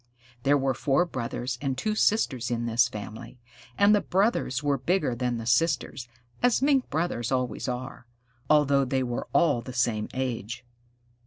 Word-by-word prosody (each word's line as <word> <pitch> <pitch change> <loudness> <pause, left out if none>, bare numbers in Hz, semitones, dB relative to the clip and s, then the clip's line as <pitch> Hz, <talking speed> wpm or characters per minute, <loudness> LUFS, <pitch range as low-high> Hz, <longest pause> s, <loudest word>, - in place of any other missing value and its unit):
There 140 +3 +3
were 135 -1 0
four 140 +7 +1
brothers 120 -4 -4
and 135 -2 -2
two 215 +10 -1
sisters 145 - +1
in 120 -1 -2
this 115 +1 +3
family, 110 +1 -8 0.4
and 200 +1 +5
the 205 - +3
brothers 185 - 0
were 140 -2 +1
bigger 170 0 0
than 120 0 -2
the 115 - -6
sisters 140 -1 0 0.3
(as 245 -2 +3
Mink 275 -1 +2
Brothers 145 -7 -2
always 125 0 -1
are), 125 0 -5 0.4
although 140 -2 +4
they 130 0 0
were 120 -1 -4
all 140 -4 +3
the 130 - -8
same 115 -3 0
age. 120 -2 -4
130 Hz, 160 wpm, -27 LUFS, 120-150 Hz, 0.4 s, and